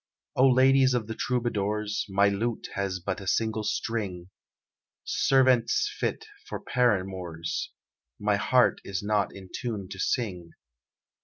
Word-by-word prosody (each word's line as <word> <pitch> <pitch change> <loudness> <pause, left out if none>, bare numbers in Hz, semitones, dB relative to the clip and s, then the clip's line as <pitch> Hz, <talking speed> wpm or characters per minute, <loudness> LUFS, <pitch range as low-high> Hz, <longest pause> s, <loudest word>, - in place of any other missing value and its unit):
"O 130 - +5
ladies 130 0 +5
of 120 -3 -1
the 110 - -5
Troubadours, 105 -4 -1
My 100 +1 +4
lute 110 +3 -2
has 95 -2 -2
but 95 +2 -4
a 95 - -8
single 110 +2 0
string; 100 -5 -3 0.7
Sirventes 130 - +3
fit 445 - -2 0.2
for - - -5
paramours, 95 -8 -1 0.5
My 105 0 +2
heart 125 +4 +3
is 100 0 -4
not 105 -1 +1
in 95 -1 -11
tune 105 -6 -4
to 95 -1 -8
sing. 90 -8 -2
105 Hz, 130 wpm, -27 LUFS, 95-120 Hz, 0.7 s, O